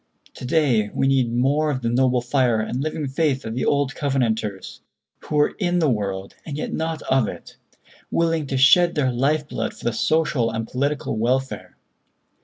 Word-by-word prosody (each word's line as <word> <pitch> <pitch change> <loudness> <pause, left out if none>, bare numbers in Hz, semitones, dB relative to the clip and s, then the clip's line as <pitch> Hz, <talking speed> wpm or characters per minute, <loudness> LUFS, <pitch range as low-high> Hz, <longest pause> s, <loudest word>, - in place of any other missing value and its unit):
"To - - -9
day 125 -7 +2
we - - +1
need 130 -3 +2
more 140 +6 +1
of 130 -4 -3
the 115 - +1
noble 125 0 +2
fire 125 -3 +1
and 120 +4 -2
living 155 -1 -3
faith 135 -1 0
of 110 - -4
the 125 - -2
old 140 -2 +1
Covenanters, 115 -8 -2 0.4
who - - -6
were 150 0 +2
in 180 -3 +1
the 155 -5 +2
world 100 -3 -3
and 145 -3 -6
yet - - -4
not 160 0 -3
of 130 -4 +2
it, - - -9 0.5
willing 165 -3 0
to 135 - -2
shed 175 +6 +5
their 135 -4 +1
life 145 +5 0
blood 110 -5 -4
for - - -15
the 120 - +1
social 150 -2 +1
and 115 0 -4
political 140 -2 -2
welfare. 130 +3 -2
135 Hz, 185 wpm, -22 LUFS, 120-150 Hz, 0.5 s, shed